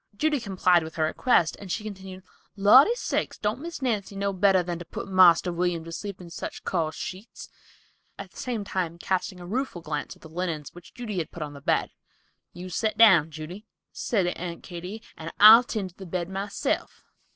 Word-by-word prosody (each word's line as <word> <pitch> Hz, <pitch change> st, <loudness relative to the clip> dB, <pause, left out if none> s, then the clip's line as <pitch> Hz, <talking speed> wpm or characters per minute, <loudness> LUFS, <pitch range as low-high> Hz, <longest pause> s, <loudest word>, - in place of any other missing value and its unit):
Judy 305 Hz, +1 st, +1 dB
complied 185 Hz, -5 st, +2 dB
with 160 Hz, 0 st, -8 dB
her 160 Hz, -, 0 dB
request 165 Hz, -, +2 dB
and 195 Hz, -3 st, -8 dB
she 215 Hz, -, -2 dB
continued: 190 Hz, -3 st, -9 dB, 0.3 s
"Lordy 250 Hz, -, +6 dB
sakes—don't 220 Hz, -, -2 dB
Miss 335 Hz, -3 st, -7 dB
Nancy 210 Hz, -5 st, -1 dB
know 200 Hz, 0 st, -1 dB
better 190 Hz, -1 st, +3 dB
than 175 Hz, -1 st, -4 dB
to 175 Hz, -, -8 dB
put -, -, -7 dB
Marster 180 Hz, -2 st, +5 dB
William 175 Hz, -1 st, -1 dB
to 165 Hz, -, -9 dB
sleep 195 Hz, +3 st, -6 dB
in 175 Hz, -2 st, -11 dB
such -, -, -7 dB
coarse 160 Hz, -4 st, -1 dB
sheets," 190 Hz, +6 st, -8 dB, 0.7 s
at -, -, -9 dB
the -, -, -18 dB
same 240 Hz, -5 st, -3 dB
time 180 Hz, -4 st, -3 dB
casting 185 Hz, +1 st, -2 dB
a 175 Hz, -, -9 dB
rueful 215 Hz, -3 st, -3 dB
glance 150 Hz, -2 st, -4 dB
at -, -, -22 dB
the -, -, -10 dB
linens 160 Hz, -2 st, -4 dB
which 175 Hz, -1 st, -15 dB
Judy 220 Hz, -6 st, -4 dB
had 160 Hz, -, -3 dB
put 165 Hz, -, -6 dB
upon 145 Hz, -1 st, -7 dB
the 140 Hz, -, -11 dB
bed. -, -, 0 dB, 0.6 s
"You 180 Hz, +1 st, -9 dB
set 215 Hz, +5 st, -1 dB
down, 185 Hz, -9 st, +6 dB
Judy," 160 Hz, +7 st, -9 dB, 0.2 s
said 200 Hz, -6 st, -1 dB
Aunt 175 Hz, -1 st, -4 dB
Katy, 180 Hz, +5 st, -8 dB
"and 160 Hz, 0 st, -7 dB
I'll 220 Hz, +3 st, +10 dB
tend 210 Hz, -6 st, -4 dB
to -, -, -34 dB
the 190 Hz, -, -10 dB
bed 175 Hz, 0 st, -3 dB
myself." 195 Hz, +1 st, -3 dB
185 Hz, 195 wpm, -26 LUFS, 170-210 Hz, 0.7 s, I'll